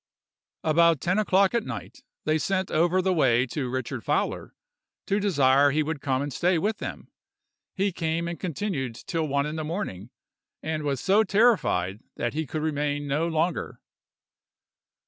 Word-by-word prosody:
"About 165 Hz, 0 st, +4 dB
ten 180 Hz, +8 st, +1 dB
o'clock 195 Hz, -1 st, +3 dB
at 235 Hz, -2 st, +1 dB
night, -, -, -7 dB, 0.2 s
they 155 Hz, +1 st, +2 dB
sent 190 Hz, +2 st, -1 dB
over 175 Hz, +4 st, +2 dB
the 190 Hz, 0 st, +2 dB
way 130 Hz, -6 st, +3 dB
to 130 Hz, 0 st, -3 dB
Richard 130 Hz, -1 st, -4 dB
Fowler, -, -, -1 dB, 0.5 s
to 200 Hz, -, +1 dB
desire 145 Hz, -8 st, +4 dB
he 155 Hz, +2 st, +1 dB
would 150 Hz, -2 st, -4 dB
come 135 Hz, -1 st, 0 dB
and 145 Hz, -1 st, -5 dB
stay 180 Hz, +4 st, +2 dB
with 210 Hz, +6 st, -1 dB
them. -, -, -7 dB, 0.6 s
He 195 Hz, 0 st, +1 dB
came 165 Hz, 0 st, -2 dB
and 170 Hz, 0 st, -5 dB
continued 160 Hz, -, -3 dB
till 160 Hz, +5 st, -3 dB
one 140 Hz, 0 st, +1 dB
in 150 Hz, +1 st, -4 dB
the 155 Hz, -, -2 dB
morning, 150 Hz, -, -4 dB, 0.5 s
and 155 Hz, -1 st, -2 dB
was 140 Hz, -4 st, -2 dB
so 205 Hz, +3 st, +4 dB
terrified 190 Hz, -, +2 dB, 0.2 s
that 120 Hz, -, -2 dB
he 155 Hz, 0 st, -2 dB
could 155 Hz, +3 st, -3 dB
remain 145 Hz, -1 st, -1 dB
no 150 Hz, +4 st, 0 dB
longer. 165 Hz, +1 st, -1 dB
160 Hz, 165 wpm, -26 LUFS, 140-185 Hz, 0.6 s, About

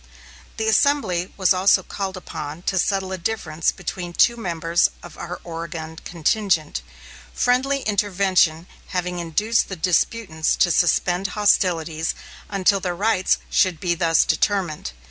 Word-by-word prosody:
The 220 Hz, -, -1 dB
assembly 215 Hz, -7 st, +2 dB
was 190 Hz, -1 st, +4 dB
also 190 Hz, +1 st, +4 dB
called 190 Hz, 0 st, -5 dB
upon 160 Hz, -2 st, -7 dB
to 190 Hz, 0 st, 0 dB
settle 190 Hz, 0 st, 0 dB
a 190 Hz, -, -4 dB
difference 175 Hz, -5 st, -1 dB
between 175 Hz, -1 st, -6 dB
two 235 Hz, +6 st, +4 dB
members 170 Hz, -5 st, +1 dB
of 175 Hz, -, -11 dB
our 175 Hz, +1 st, -7 dB
Oregon 165 Hz, -1 st, -6 dB
contingent, 170 Hz, -1 st, 0 dB, 0.5 s
friendly 265 Hz, +3 st, +1 dB
intervention 190 Hz, -5 st, +1 dB, 0.2 s
having 180 Hz, -1 st, -3 dB
induced 205 Hz, +8 st, 0 dB
the 190 Hz, -, -4 dB
disputants 180 Hz, -1 st, 0 dB
to 175 Hz, -, +3 dB
suspend 175 Hz, +2 st, +2 dB
hostilities 165 Hz, -6 st, +1 dB, 0.3 s
until 195 Hz, 0 st, +2 dB
their 180 Hz, -2 st, -3 dB
rights 195 Hz, -1 st, +2 dB
should 180 Hz, -4 st, +2 dB
be 175 Hz, -2 st, 0 dB
thus 165 Hz, -1 st, +3 dB
determined. 180 Hz, -, -1 dB
180 Hz, 130 wpm, -22 LUFS, 170-200 Hz, 0.5 s, was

